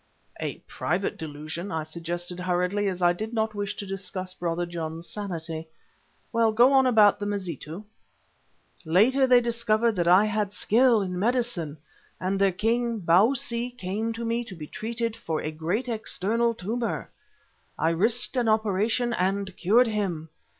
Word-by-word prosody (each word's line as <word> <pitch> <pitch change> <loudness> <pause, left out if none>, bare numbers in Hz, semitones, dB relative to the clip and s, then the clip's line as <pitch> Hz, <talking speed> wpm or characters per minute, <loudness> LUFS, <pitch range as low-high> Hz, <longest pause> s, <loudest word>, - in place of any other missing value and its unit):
"A - - -3
private 180 +5 -2
delusion," 160 +4 -6
I 160 -2 -2
suggested 175 +2 -5
hurriedly, 180 +3 0
as 185 -2 -2
I 175 0 +5
did 220 +6 -5
not 220 -1 0
wish 205 0 -3
to 205 - -6
discuss 190 -1 -5
Brother 175 -1 -2
John's 165 -1 -5
sanity. 165 -5 -4 0.7
"Well, 230 -1 +3
go 240 +5 +5
on 265 -1 +5
about 215 -4 +5
the 205 - -3
Mazitu." 185 -3 -5 1.0
"Later 225 +11 +4
they 250 -1 +7
discovered 230 -1 +1
that 170 -1 +1
I 185 +4 +6
had 210 -1 -1
skill 230 +1 +3
in 180 -1 -4
medicine, 220 - 0 0.4
and 190 +1 -1
their 195 -1 +4
king, 230 +4 0
Bausi, 235 +7 +2
came 210 +3 -2
to 230 +1 -5
me 230 +1 0
to 190 - -9
be 155 -3 -7
treated 230 +5 -3
for 160 -6 -3
a 155 - -3
great 175 +11 -2
external 230 0 0
tumour. 230 +5 -3 0.7
I 160 - +2
risked 220 +11 +2
an 240 -2 +2
operation 220 +3 +1
and 190 -1 -1
cured 225 +8 +4
him. 190 -8 -2
205 Hz, 155 wpm, -26 LUFS, 175-230 Hz, 1.0 s, they